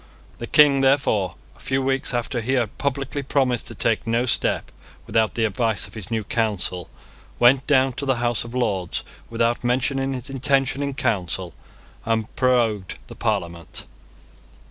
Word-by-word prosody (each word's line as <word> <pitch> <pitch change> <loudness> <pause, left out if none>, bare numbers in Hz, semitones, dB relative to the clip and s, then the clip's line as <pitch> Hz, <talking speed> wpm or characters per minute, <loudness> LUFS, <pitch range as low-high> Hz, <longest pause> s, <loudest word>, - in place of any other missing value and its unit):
The 120 - -5
King, 140 -1 +6
therefore, 135 -9 +2 0.2
a - - -22
few 135 0 -1
weeks 135 0 +1
after 120 0 -2
he 130 +4 -1
had 120 -5 -1
publicly 140 0 -2
promised 130 -3 0
to - - -5
take 115 0 0
no 115 +2 +1
step 125 - 0 0.3
without 110 -1 +1
the 115 - +2
advice 110 +1 +1
of - - -13
his 110 -5 -7
new 110 -2 -1
Council, 100 -6 -1 0.5
went 130 +2 +4
down 135 -3 +3
to 140 - -4
the 135 - +3
House 120 -1 0
of 120 +1 -9
Lords 100 -8 -1 0.3
without 115 +1 0
mentioning 135 +2 0
his 125 -2 -6
intention 135 0 +1
in 140 -1 -2
Council, 100 - -1 0.5
and 110 -1 -1
prorogued 115 -7 +1
the - - -9
Parliament. 85 -7 -3
120 Hz, 160 wpm, -23 LUFS, 110-135 Hz, 0.5 s, King